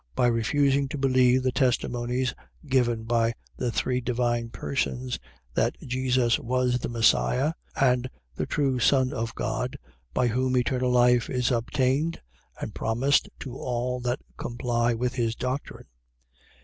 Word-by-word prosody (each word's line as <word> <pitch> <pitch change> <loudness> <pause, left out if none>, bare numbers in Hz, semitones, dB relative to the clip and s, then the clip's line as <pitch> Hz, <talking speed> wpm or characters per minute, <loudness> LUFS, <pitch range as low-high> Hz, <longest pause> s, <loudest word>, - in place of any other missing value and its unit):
.By - - +3
refusing 135 +4 +2
to 145 - -5
believe 130 -1 +3
the 130 - +2
testimonies 125 -1 0 0.3
given 120 -5 +1
by 115 0 +1 0.2
the 125 -2 -2
three 125 +2 0
divine 120 -1 0
persons, 70 - -2 0.3
that - - +1
Jesus 130 -2 +1
was 125 0 0
the - - -4
Messias, 125 +5 +2 0.3
and 125 -1 +3 0.2
the - - -3
true 135 -4 0
Son 130 +1 +3
of 115 -2 -3
God, 115 +3 -2 0.3
by 125 - +1
whom 130 +2 +1
eternal 125 0 +1
life 125 -1 +4
is 125 0 0
obtained 130 +6 0 0.4
and - - -5
promised 125 +6 +1
to 130 -3 -6
all 125 0 -2
that 125 0 -2 0.2
comply 120 -1 0
with 125 +2 -1
his 115 -2 -1
doctrine. 130 +4 -4
125 Hz, 135 wpm, -26 LUFS, 120-130 Hz, 0.4 s, life